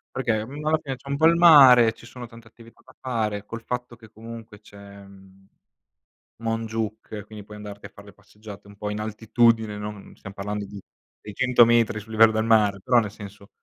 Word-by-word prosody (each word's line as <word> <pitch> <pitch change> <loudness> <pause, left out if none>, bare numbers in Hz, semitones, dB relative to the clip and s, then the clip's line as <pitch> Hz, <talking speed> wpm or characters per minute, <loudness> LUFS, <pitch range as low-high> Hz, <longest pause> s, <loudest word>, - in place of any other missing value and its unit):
Perché, 110 -5 -2
mhmm, 145 +4 -9
alla 160 +1 +2
fine, 135 -3 -5
c'è 135 +2 -15
un 140 - -1
po' 160 +3 +3
il 170 +1 +4
mare, 135 -9 +7
ci 115 - -17
sono 120 +1 -10
tante 115 0 -16
attività 115 +1 -19
da - - -19
fare, 110 -5 -3
col 115 +2 -9
fatto 125 -1 -6
che, 110 -2 -17
comunque, 115 -1 -12
c'è, 100 -1 -17 0.3
mhmm, 95 0 -19 1.0
Montjuïc, 110 -2 -4
quindi 105 -1 -11
puoi 105 0 -13
andarti 105 -1 -10
a - - -9
far' 100 - -16
le 100 - -15
passeggiate 105 -1 -14
un 100 - -15
po' 105 +1 -6
in 105 0 -5
altitudine, 110 0 0
non 105 -1 -9
stiam 100 - -12
parlando 105 +1 -5
di 100 0 -11 0.4
600 120 +3 +2
metri 115 -2 +1
sul 110 +2 -14
livello 110 0 +5
del 110 0 -1
mare, 105 -3 +2
però, 125 -2 +3
nel 105 -3 -4
senso, 100 0 -13
110 Hz, 205 wpm, -23 LUFS, 105-120 Hz, 1.0 s, mare